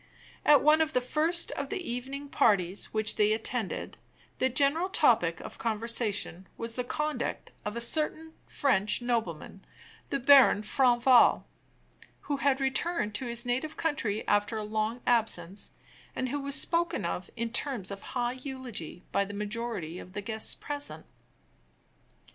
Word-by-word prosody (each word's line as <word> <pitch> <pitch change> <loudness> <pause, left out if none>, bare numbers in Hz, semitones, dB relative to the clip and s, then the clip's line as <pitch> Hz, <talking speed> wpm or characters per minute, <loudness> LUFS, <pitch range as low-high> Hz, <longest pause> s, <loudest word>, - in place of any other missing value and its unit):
At 295 -2 +6
one 305 +2 +5
of 315 -1 0
the - - +3
first 315 +7 +1
of 280 -1 -4
the - - -2
evening 275 -3 -5
parties 200 -7 +2
which 215 -1 0
they 210 0 +4
attended, 225 -1 -3 0.4
the 260 - +3
general 285 +8 +2
topic 220 - +3
of - - -10
conversation 215 -4 -2
was 230 0 -3
the 250 - -1
conduct 300 +4 -3
of 210 +2 -3
a - - -2
certain 315 +5 -1
French 240 -5 +1
nobleman, 205 -6 -3 0.5
the 275 - 0
Baron 265 -5 +6
Franval, 245 +1 +4 0.8
who 285 - -2
had 275 -1 +2
returned 270 -3 0
to 245 +5 -4
his 235 +1 -1
native 260 +6 -2
country 235 -10 -2
after 205 +2 +1
a 215 - -3
long 215 +3 -2
absence, 205 -5 +1 0.5
and 255 - -2
who 290 - -2
was 280 0 -1
spoken 340 - +1
of 180 +2 -3
in 230 0 -2
terms 245 -9 -2
of 200 0 -6 0.2
high 240 0 +1
eulogy 255 - -6
by 200 - +2
the 200 +1 -7
majority 210 -5 -4
of 185 - -12
the 205 - -4
guests 220 +1 0
present. 290 0 -4
240 Hz, 150 wpm, -29 LUFS, 210-280 Hz, 0.8 s, At